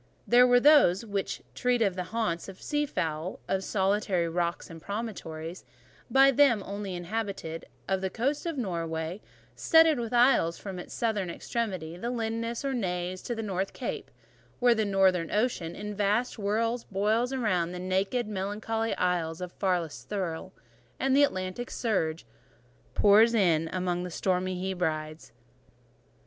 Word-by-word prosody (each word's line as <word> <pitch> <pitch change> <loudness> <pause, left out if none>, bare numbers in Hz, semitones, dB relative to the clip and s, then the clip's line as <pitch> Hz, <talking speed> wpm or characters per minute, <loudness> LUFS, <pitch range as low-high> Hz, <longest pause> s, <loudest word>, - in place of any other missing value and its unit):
They 240 +1 +6
were 245 0 +6
those 245 - +5
which 200 -2 -3
treat 250 -1 +1
of 195 -4 +1
the 180 -1 -3
haunts 195 -5 -2
of 190 - -11
sea 295 0 -1
fowl; 160 - -3
of 190 - +1
"the - - -8
solitary 195 -3 +1
rocks 170 +1 -2
and 165 -1 -11
promontories" 180 -5 -5 0.5
by 270 +1 +6
them 255 -6 +4
only 200 -1 -5
inhabited; 175 -3 -4 0.2
of 190 -1 0
the 190 - -1
coast 275 - -1
of 330 -3 -3
Norway, 170 -3 -3 0.3
studded 320 -4 +5
with 230 -2 -4
isles 240 -9 +4
from 190 -3 -7
its - - -9
southern 210 -6 -1
extremity, 185 -5 -4
the 235 +6 -3
Lindeness, 230 +1 -3
or 275 - 0
Naze, 180 -5 -2
to 240 - -4
the 225 - -4
North 195 -2 -2
Cape— - - -5 0.5
"Where 245 -1 +5
the 220 -2 0
Northern 190 -4 +2
Ocean, 210 -7 -1
in 210 0 -5
vast 210 +4 +1
whirls, 225 +3 -1
Boils 215 +5 +1
round 185 -9 0
the 180 - -6
naked, 190 +6 -1
melancholy 215 +3 -2
isles 170 -3 0
Of 180 -1 -5
farthest 180 -6 -2
Thule; 185 -3 -3 0.5
and 270 0 +2
the 285 - +6
Atlantic 185 -1 -1
surge 165 - -1 0.7
Pours 220 +3 +6
in 165 -6 +3
among 180 -1 -1
the 180 - -4
stormy 185 +1 -1
Hebrides." 155 -6 -3
195 Hz, 155 wpm, -28 LUFS, 180-230 Hz, 0.7 s, They